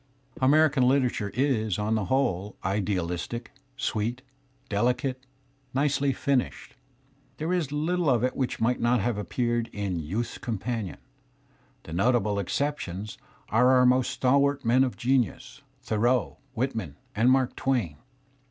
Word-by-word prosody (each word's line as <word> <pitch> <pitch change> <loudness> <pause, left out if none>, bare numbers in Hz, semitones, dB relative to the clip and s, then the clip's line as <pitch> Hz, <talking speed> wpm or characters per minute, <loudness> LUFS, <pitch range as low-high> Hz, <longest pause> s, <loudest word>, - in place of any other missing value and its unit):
[ 130 - -19
American 145 +1 +4
hterature 125 -5 +1
is 115 -7 +1
on 105 +1 0
the 110 -3 0
who 130 - +1
le 105 -7 0
idea 95 -2 0
ligtici..aEfifit».,deli 125 +3 -4
i - - +4
cate, 130 +1 -5 0.5
nicely 140 0 +2
finished. 135 0 -1 0.6
There 160 +4 -1
is 175 -5 0
httle 160 +4 -1
of 120 -3 +2
it 130 - 0
which 130 -2 -2
might 120 +2 +1
not 120 +1 +2
have 105 +1 -1
appeared 120 +1 -1
in 100 -3 -3
the 80 0 -6
YauUCs 115 +4 -3
Companion, 110 -3 -3 0.9
The - - -11
notabL 105 +2 +2
exceptions 105 -7 -3 0.3
are 125 +3 +4
our 130 -1 +5
most 125 0 +3
stalwart 140 +1 +2
men 125 +3 +4
of 130 - -2
genius, 125 -5 -1 0.2
Thoreaul 110 - +1 0.2
Whitg 130 +4 0
iari^ 90 -11 -5 0.2
AT^d^ 115 +3 +3
Mark 130 -1 +2
Twain 115 - -1
125 Hz, 145 wpm, -27 LUFS, 105-135 Hz, 0.9 s, our